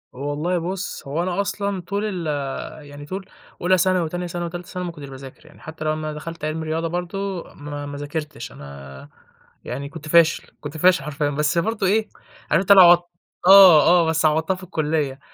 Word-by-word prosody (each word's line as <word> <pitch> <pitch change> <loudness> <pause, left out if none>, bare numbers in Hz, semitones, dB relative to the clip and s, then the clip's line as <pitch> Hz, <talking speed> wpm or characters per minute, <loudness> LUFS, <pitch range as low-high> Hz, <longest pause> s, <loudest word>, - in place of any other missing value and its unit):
هو 140 +3 -4
والله 165 +5 -1
بُص 180 -3 -5
هو 155 +5 -1
أنا 185 +2 -1
أصلًا 200 -1 -3
طول 200 +4 -3
ال 180 -6 -3 0.6
يعني 145 0 -10
طول 190 +5 -6 0.4
أولى 185 +1 +3
ثانوي، 185 -2 +1
تانية 175 +1 -4
ثانوي، 175 0 -4
تالتة 175 0 -8
ثانوي 180 0 -5
ما 170 - -4
كنتش 145 -4 -10
باذاكر 135 0 -12
يعني، - - -18
حتى 160 0 -8
لمّا 155 0 -2
دخلت 165 +1 -7
علمي 160 +1 -3
رياضة 160 +1 -2
برضه، 180 +2 -4
ما 145 -1 -7
ما 145 0 -7
ذاكرتش، 145 -2 -6
أنا 70 -1 -11 0.6
يعني 140 +3 -5
كنت 150 +2 -10
فاشل 165 0 +4 0.2
كنت 145 +2 -7
فاشل 180 -2 +4
حرفيًا، 145 0 -2
بس 150 +3 0
برضه 210 +2 0
إيه، 215 +3 +1 0.4
عارف 150 - +4
أنت 195 - +1
اللي 195 -1 +10
عوضت 175 0 +6 0.4
آه، 190 -5 +9
آه 175 -1 +5
بس 160 0 +1
عوضتها 160 +4 +2
في 185 - -12
الكليّة، 150 -5 -2
165 Hz, 190 wpm, -22 LUFS, 150-180 Hz, 0.6 s, اللي